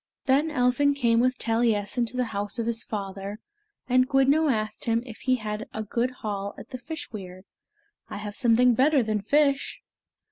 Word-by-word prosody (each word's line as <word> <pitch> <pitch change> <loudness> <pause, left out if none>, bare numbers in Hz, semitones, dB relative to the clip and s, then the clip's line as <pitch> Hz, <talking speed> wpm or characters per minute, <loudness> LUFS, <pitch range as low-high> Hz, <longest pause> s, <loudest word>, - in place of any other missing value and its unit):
Then 275 +4 +3
Elphin 285 0 +2
came 235 -4 +2
with 255 +1 +2
Taliessin 225 0 0
to 250 - -4
the 250 - +2
house 205 +1 -3
of 230 - -1
his 230 -1 -1
father, 200 0 -5 0.5
and 255 +1 +3
Gwyddno 280 +2 +3
asked 215 -2 -2
him 230 0 +1
if 230 -4 -10
he 255 -1 +1
had 215 -2 -5
a 220 - -2
good 235 +4 -1 0.2
haul 200 -1 -3
at - - -12
the 255 - -6
fish 315 +6 -7
weir. 185 -3 -8 0.7
"I - - -6
have 205 0 -6
something 245 0 +4
better 270 +2 +3
than 215 -1 -1
fish." 280 +5 +1
235 Hz, 180 wpm, -26 LUFS, 210-260 Hz, 0.7 s, something